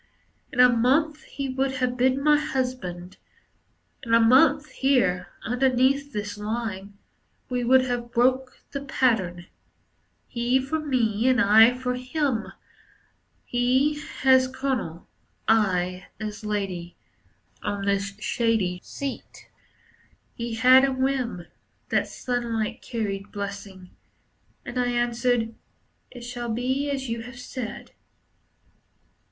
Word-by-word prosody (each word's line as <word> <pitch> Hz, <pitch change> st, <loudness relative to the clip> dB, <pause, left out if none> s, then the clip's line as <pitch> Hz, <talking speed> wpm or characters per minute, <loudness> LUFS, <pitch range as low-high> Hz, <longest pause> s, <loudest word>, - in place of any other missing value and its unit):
In -, -, -5 dB
a 250 Hz, -, +9 dB
month 280 Hz, +6 st, +1 dB
he 275 Hz, -1 st, -5 dB
would 265 Hz, +1 st, -1 dB
have 255 Hz, -1 st, -1 dB
been 260 Hz, +2 st, +2 dB
my 300 Hz, 0 st, +5 dB
husband. 250 Hz, -12 st, -3 dB, 0.8 s
In 230 Hz, -2 st, +2 dB
a -, -, +6 dB
month, 285 Hz, +6 st, +5 dB
here, 240 Hz, -10 st, +1 dB, 0.2 s
underneath 260 Hz, +3 st, +1 dB
this 210 Hz, -2 st, -5 dB
lime, 210 Hz, -2 st, -4 dB, 0.5 s
We 250 Hz, -1 st, -1 dB
would 260 Hz, +2 st, +5 dB
have 240 Hz, -1 st, -3 dB
broke 255 Hz, +2 st, +1 dB
the 280 Hz, -, -4 dB
pattern; 220 Hz, -11 st, 0 dB, 0.8 s
He 245 Hz, +2 st, +1 dB
for 270 Hz, +5 st, -2 dB
me, 245 Hz, -6 st, 0 dB
and 255 Hz, -1 st, +4 dB
I 225 Hz, +3 st, +6 dB
for 250 Hz, 0 st, -2 dB
him, 255 Hz, -2 st, -2 dB, 0.9 s
He 260 Hz, +5 st, +1 dB, 0.2 s
as 260 Hz, -1 st, +6 dB
Colonel, 260 Hz, -10 st, -3 dB, 0.4 s
I 185 Hz, -4 st, +1 dB
as 215 Hz, +1 st, -6 dB
Lady, 195 Hz, -5 st, -3 dB, 0.7 s
On 200 Hz, -1 st, -3 dB
this 200 Hz, 0 st, 0 dB
shady 220 Hz, -7 st, 0 dB
seat. 280 Hz, -2 st, -7 dB, 0.8 s
He 235 Hz, -1 st, -4 dB
had 255 Hz, +3 st, +7 dB
a 275 Hz, -, +3 dB
whim 260 Hz, -8 st, -1 dB, 0.4 s
That -, -, +1 dB
sunlight 235 Hz, -2 st, -3 dB
carried 205 Hz, -4 st, -4 dB
blessing. 200 Hz, -2 st, -7 dB, 0.7 s
And 245 Hz, +1 st, -4 dB
I 245 Hz, -, +1 dB
answered, 240 Hz, -1 st, 0 dB, 0.6 s
"It 245 Hz, -, -11 dB
shall 240 Hz, 0 st, -5 dB
be 260 Hz, +5 st, -1 dB
as 270 Hz, -2 st, -3 dB
you 230 Hz, 0 st, -3 dB
have 245 Hz, +2 st, -10 dB
said." 245 Hz, -3 st, -7 dB
245 Hz, 115 wpm, -25 LUFS, 215-260 Hz, 0.9 s, a